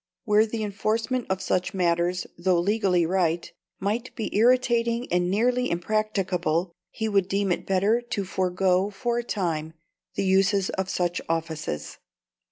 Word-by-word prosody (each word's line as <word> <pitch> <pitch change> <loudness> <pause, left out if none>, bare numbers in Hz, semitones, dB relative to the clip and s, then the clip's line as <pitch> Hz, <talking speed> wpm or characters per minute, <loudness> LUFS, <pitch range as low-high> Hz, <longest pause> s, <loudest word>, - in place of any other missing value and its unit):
Where 215 0 +4
the 220 0 -3
enforcement 220 +4 -1
of 190 0 -1
such 185 +1 -1
matters, 175 0 +1
though 175 0 +2
legally 190 -2 +2
right, 170 -1 0 0.3
might 220 +6 -2
be 225 - -4
irritating 235 +1 +3
and 180 0 +2
nearly 245 +5 +1
impracticable, 180 -3 0 0.2
he 220 - -3
would 200 -3 +2
deem 195 -1 0
it - - -2
better 200 +5 +2
to 200 -5 -2
forego 185 +1 +1
for 240 +4 -2
a - - -3
time 165 -8 -2 0.4
the - - 0
uses 195 +1 +3
of 190 0 -3
such 175 -2 -1
offices. 160 - -3
195 Hz, 145 wpm, -25 LUFS, 180-220 Hz, 0.4 s, Where